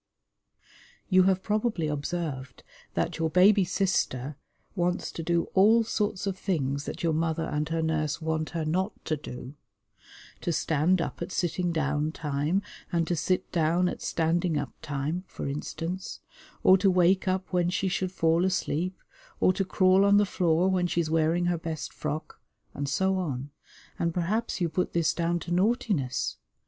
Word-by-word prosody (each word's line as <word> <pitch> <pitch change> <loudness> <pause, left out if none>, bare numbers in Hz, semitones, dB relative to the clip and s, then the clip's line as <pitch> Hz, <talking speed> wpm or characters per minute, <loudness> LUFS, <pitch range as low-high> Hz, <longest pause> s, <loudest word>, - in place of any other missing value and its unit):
You 185 -1 +5
have 190 -1 +2
probably 215 -5 0
observed 150 -2 -4 0.3
that - - -1
your 160 0 +1
baby 190 +4 +5
sister 165 -7 0 0.4
wants 180 -1 -1
to - - -6
do 170 +1 +1
all 220 +4 +5
sorts 210 -3 -1
of 195 -1 -3
things 140 -6 -1
that - - -6
your 165 -1 +2
mother 160 0 0
and 150 0 -2
her 165 0 0
nurse 155 -2 0
want 160 -1 -2
her 165 -2 -3
not 185 +6 0
to 155 - 0
do: 125 -2 -8 0.9
to 175 - -2
stand 165 +3 +2
up - - -6
at - - -4
sitting 175 0 0
down 150 -1 0
time, 150 +6 -1 0.3
and 170 -2 +1
to 175 - +2
sit 180 +3 -1
down 170 +1 +2
at - - -4
standing 165 0 0
up 140 -3 -3
time, 150 +4 -3
for - - -6
instance, 165 +6 -4 0.4
or 190 0 +7
to 195 - +4
wake 185 +2 +3
up 185 0 -1
when 175 -1 +2
she 190 +1 0
should 185 0 -1
fall 165 -1 +2
asleep, 185 -1 -1 0.4
or 185 - +4
to 195 - 0
crawl 185 0 +4
on 200 0 +5
the 205 - +4
floor 175 -2 +2
when 185 -2 +2
she 175 - -1
is 160 -2 -1
wearing 165 +2 +2
her 175 -1 0
best 160 -2 -5
frock, 155 +1 -5 0.3
and 140 0 -3
so 190 +6 +1
on, 140 -5 -4 0.5
and 170 -1 0
perhaps 200 +7 -1
you 175 - +1
put 180 +3 -2
this 165 -2 +2
down 170 0 0
to 170 - -7
naughtiness. 185 - 0
170 Hz, 170 wpm, -28 LUFS, 155-185 Hz, 0.9 s, or